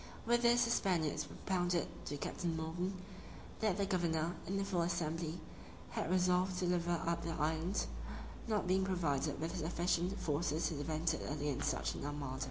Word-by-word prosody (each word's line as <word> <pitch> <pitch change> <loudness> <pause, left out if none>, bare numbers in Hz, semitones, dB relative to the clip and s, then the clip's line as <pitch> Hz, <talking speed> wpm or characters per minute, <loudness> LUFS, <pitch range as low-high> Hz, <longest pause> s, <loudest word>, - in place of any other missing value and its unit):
With 240 +1 +4
this 240 0 +5
the 235 - 0
Spaniards 175 -9 +2
propounded 175 -2 0 0.2
to 145 - -3
Captain 165 +3 -2
Morgan, 175 +4 -2 0.6
that 210 -4 +2
the 200 - +2
governor, 170 -3 +1
in 195 +2 0
a 195 - 0
full 180 -3 +1
assembly, 165 -1 -1 0.5
had - - -1
resolved 180 0 +3
to 180 - 0
deliver 175 -1 +2
up 170 0 +1
the 165 - -2
island, 160 +5 0 0.6
not 215 -4 +1
being 190 +1 +3
provided 160 -6 0
with 160 +2 -2
sufficient 175 +3 0
forces 160 0 +1
to - - -3
defend 155 +3 0
it - - -3
against 145 -1 0
such 135 - 0
an - - -6
armada. 145 -3 -3
170 Hz, 170 wpm, -37 LUFS, 160-185 Hz, 0.6 s, this